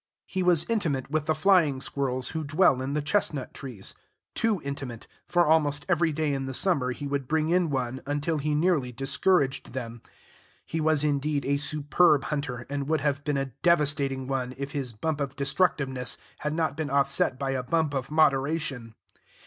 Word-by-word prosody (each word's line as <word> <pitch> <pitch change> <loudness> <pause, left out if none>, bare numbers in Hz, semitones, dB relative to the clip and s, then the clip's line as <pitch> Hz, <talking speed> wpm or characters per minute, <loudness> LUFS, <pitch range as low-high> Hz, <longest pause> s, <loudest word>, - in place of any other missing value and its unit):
He 190 - -3
was 175 -3 +3
intimate 155 - -1
with 155 0 -1
the 155 - +2
flying 155 -5 +3
squirrels 130 -2 -1
who 160 0 -3
dwell 145 -3 +3
in 135 +2 -3
the 150 - 0
chestnut 150 -5 0
trees, 125 -8 -6 0.4
too 225 -4 +1
intimate, 135 -4 -6 0.2
for 175 0 +3
almost 150 -2 +2
every 170 -2 +2
day 155 -1 -1
in 135 -1 -2
the 130 - -5
summer 140 -9 +2
he 145 +3 -6
would 140 -2 -2
bring 155 +1 +1
in 175 -1 +2
one, 130 -2 -2
until 145 +2 -1
he 150 +1 0
nearly 150 -6 +1
discouraged 140 +2 +1
them. 120 -3 -6 0.6
He 160 - -3
was, 155 -1 +2
indeed, 145 0 0
a 140 +1 +1
superb 150 +1 +2
hunter, 135 -5 -3
and 140 0 -3
would 155 -1 +1
have 145 0 0
been 145 -1 0
a 135 -2 -3
devastating 145 -6 +2
one, 130 -1 -3
if 140 +1 -5
his 135 -4 -2
bump 150 +7 -3
of 140 -1 -3
destructiveness 135 -3 0 0.2
had 150 0 -2
not 160 -3 0
been 155 -1 -3
offset 140 -1 +1
by 135 0 -2
a 130 -1 -1
bump 155 +3 0
of 135 -1 -3
moderation. 140 -5 +1
145 Hz, 180 wpm, -27 LUFS, 135-155 Hz, 0.6 s, was